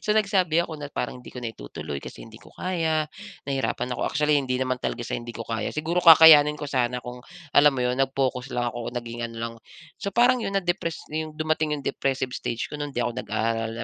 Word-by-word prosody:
So - - -1
nagsabi 190 -6 +2
ako 160 -3 -8
na 145 - -5
parang 125 -2 -4
hindi - - -12
ko - - -9
na 120 -2 -4
itutuloy 70 +2 -7
kasi - - -9
hindi - - -14
ko - - -16
kaya. 160 -4 -1 0.4
Nahihirapan 135 -2 -1
ako - - -4
actually, 150 +2 +2
hindi 130 -3 0
naman 130 -1 -1
talaga 120 - -3
sa - - -3
hindi 120 0 -5
ko - - -7
kaya 115 -1 -2
siguro 165 +4 -1
kakayanin 155 -2 +9
ko 150 - -5
sana 125 -3 0
kung 125 0 -8 0.3
alam 145 +1 +7
mo 135 -2 -4
'yon, 125 - +1
nagpokus 135 -1 0
lang 120 -1 -1
ako 120 -1 -5
at - - -14
naging 120 0 -7
ano 115 - -11
lang. 115 0 -4 0.5
So 200 - -2
parang 245 +3 +4
'yon, 195 -2 -2
na-depress 175 -3 -3
na 155 - -1
yung - - -12
dumating 155 0 0
yung - - -11
depressive 130 -1 -1
stage 115 - -3
ko - - -11
no'n, 145 -1 -4
hindi 135 - -5
ako 120 0 0
nag-aaral, 115 +1 -1
135 Hz, 230 wpm, -25 LUFS, 120-155 Hz, 0.5 s, kakayanin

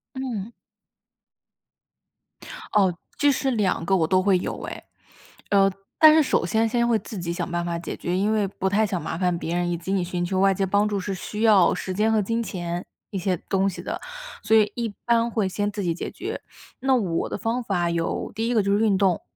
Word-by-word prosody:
嗯。 235 -5 -4 2.2
哦， 190 -4 +3 0.2
这 290 0 +4
是 270 0 0
2 205 -7 0
个 190 +1 +2
我 160 -3 +2
都 185 +2 +3
会 190 -2 +3
有 - - -5
哎。 - - -7 0.7
呃， 195 -1 +5 0.3
但 310 -1 +8
是 315 - +6
首 260 - +1
先 225 +4 +2
先 235 +1 +1
会 225 -2 +3
自 210 - -8
己 170 -1 -3
想 175 - -4
办 175 0 -1
法 170 -1 -2
解 170 - -6
决， 175 +1 -2
因 205 +3 +1
为 210 -2 +2
不 190 0 -2
太 210 +2 +2
想 185 -4 -2
麻 160 - -4
烦 180 -2 +1
别 170 +1 -3
人， 175 0 0
以 170 - 0
及 180 +3 -5
你 185 -3 +1
寻 175 0 -2
求 190 +1 -1
外 195 0 +5
界 195 0 0
帮 205 +2 +2
助 200 -2 -1
是 195 +1 -3
需 210 +4 -5
要 205 -6 +5
时 185 - -4
间 220 +3 +2
和 215 - +3
金 230 +3 -1
钱 175 -4 -4 0.3
一 195 - -3
些 185 0 0
东 195 0 +2
西 185 - -6
的， - - -4 0.4
所 220 - +3
以 210 -1 +4
一 230 -4 -3
般 235 0 +3
会 215 -4 0
先 205 +2 -1
自 205 -1 -4
己 170 -2 0
解 - - -5
决。 - - -6 0.4
那 265 0 +2
我 180 -8 -1
的 - - -3
方 235 +4 -1
法 175 -5 0
有， 170 0 -2
第 225 +1 -2
一 245 - 0
个 215 - +4
就 200 0 0
是 - - 0
运 200 -3 +3
动， 190 -4 +2
195 Hz, 240 characters per minute, -24 LUFS, 180-220 Hz, 2.2 s, 但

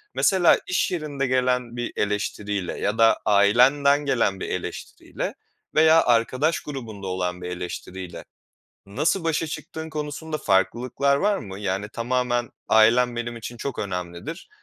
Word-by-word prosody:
Mesela 185 -4 +4
iş 180 - +1
yerinde 150 -5 -2
gelen 125 -2 0
bir 120 0 -3
eleştiriyle 105 -2 -2
ya 105 +2 -1
da 115 0 +5
ailenden 130 +8 +4
gelen 115 -8 +1
bir - - -4
eleştiriyle - - -5 0.4
veya 160 +1 +6
arkadaş 130 +7 +2
grubunda 110 -9 -7
olan 90 -1 -2
bir 90 - -5
eleştiriyle 90 0 -6 0.6
nasıl 155 - 0
başa 165 0 0
çıktığın 160 +1 -7
konusunda 155 +1 -4
farklılıklar 120 +8 +1
var 205 +6 +1
mı? 95 - -8
Yani, 100 +1 -2
tamamen 120 +1 -1 0.2
"Ailem 120 +2 +4
benim 120 0 -4
için 120 +2 -7
çok 140 +3 -5
önemlidir. 90 - -5
120 Hz, 130 wpm, -24 LUFS, 100-145 Hz, 0.6 s, veya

